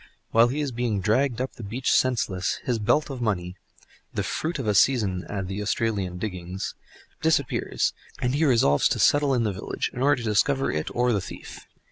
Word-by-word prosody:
While 115 +1 +6
he 140 +5 -2
is 145 -2 -2
being 120 -4 -1
dragged 115 +6 +1
up 130 +1 -3
the 115 - -10
beach 120 +6 -1
senseless, 110 -8 +1
his 120 -3 0
belt 145 +8 +1
of 130 -2 -6
money—the 90 -5 -5
fruit 160 +1 -2
of 135 - -4
a 105 - +2
season 100 -5 +2
at 95 -3 -3
the 100 +2 -4
Australian 105 -4 -1
diggings—disappears; 95 - -2 0.3
and 125 +1 0
he 145 +3 +1
resolves 115 - +4
to - - -1
settle 145 -2 +3
in 120 - +1
the 105 -3 0
village, 95 - -3
in 125 - -5
order 140 -3 +3
to 110 - -1
discover 135 +6 +2
it 75 0 -2
or 125 0 +2
the 100 - 0
thief. - - -10
115 Hz, 185 wpm, -25 LUFS, 95-130 Hz, 0.3 s, While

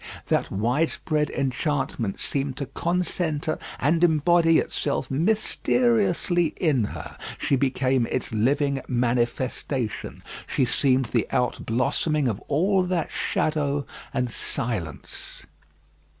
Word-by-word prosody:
That - - +1
widespread 150 - 0
enchantment 135 -5 -1
seemed 135 -2 -1
to 140 - -2
concentre 165 0 -1 0.2
and 160 +5 +2
embody 165 0 +4
itself 140 -2 -1
mysteriously 195 - +2
in 140 - +2
her; - - -7 0.2
she - - +1
became 130 -2 +1
its 130 - -2
living 140 +5 +1
manifestation. 120 0 -1 0.2
She 130 - +1
seemed 130 +1 +2
the 115 -4 +2
outblossoming 130 +5 +1
of 110 -5 -1
all 185 +7 +2
that 180 -3 -1
shadow 145 -2 0 0.3
and 125 - 0
silence. 115 - -5
140 Hz, 100 wpm, -25 LUFS, 125-165 Hz, 0.3 s, embody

